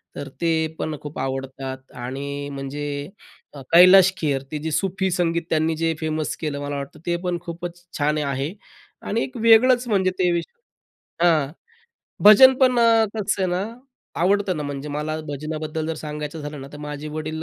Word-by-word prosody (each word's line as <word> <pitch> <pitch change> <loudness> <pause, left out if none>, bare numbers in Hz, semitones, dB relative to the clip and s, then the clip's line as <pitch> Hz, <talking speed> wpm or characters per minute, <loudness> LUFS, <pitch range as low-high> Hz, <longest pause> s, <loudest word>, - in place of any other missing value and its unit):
तर 140 - -6
ते 165 -1 +2 0.3
पण 155 -1 -2
खूप 150 0 -8
आवडतात 130 0 -5
आणि 140 +2 -5
म्हणजे 140 +1 -5 0.7
अ, 140 - -9
कैलाश 185 +2 +8
खेर 140 -4 0
ते 150 - -2
जे 160 +1 -4
सूफी 190 +2 0
संगीत 170 -1 0
त्यांनी 160 0 +1
जे 165 0 +1
फेमस 155 -1 -2
केलं, 145 -2 -3
मला 145 0 -4
वाटतं 140 +2 -7
ते 175 0 0
पण 180 -1 -1
खूपच 175 +1 -7
छान 150 +1 +1
आहे 140 +3 -2 0.5
आणि 230 +3 0
एक 255 - -7
वेगळंच 240 +2 +5
म्हणजे 190 -4 +2
ते 180 -1 +3
विषय 170 - -7
हां, 155 -4 +3 0.7
भजन 260 +6 +9
पण 255 -2 +4 0.4
कसं 200 -2 -1
आहे - - +2
ना, 180 +2 0 0.6
आवडतं 195 -1 +2
ना, 150 - -3
म्हणजे 145 0 -5
मला 150 +2 -3
भजनाबद्दल 155 +2 -4
जर 160 - -2
सांगायचं 150 +1 -6
झालं 145 -1 -7
ना, 135 - -9
तर 145 - -9
माझे 150 0 -6
वडील 155 +1 -5
155 Hz, 170 wpm, -23 LUFS, 145-180 Hz, 0.7 s, भजन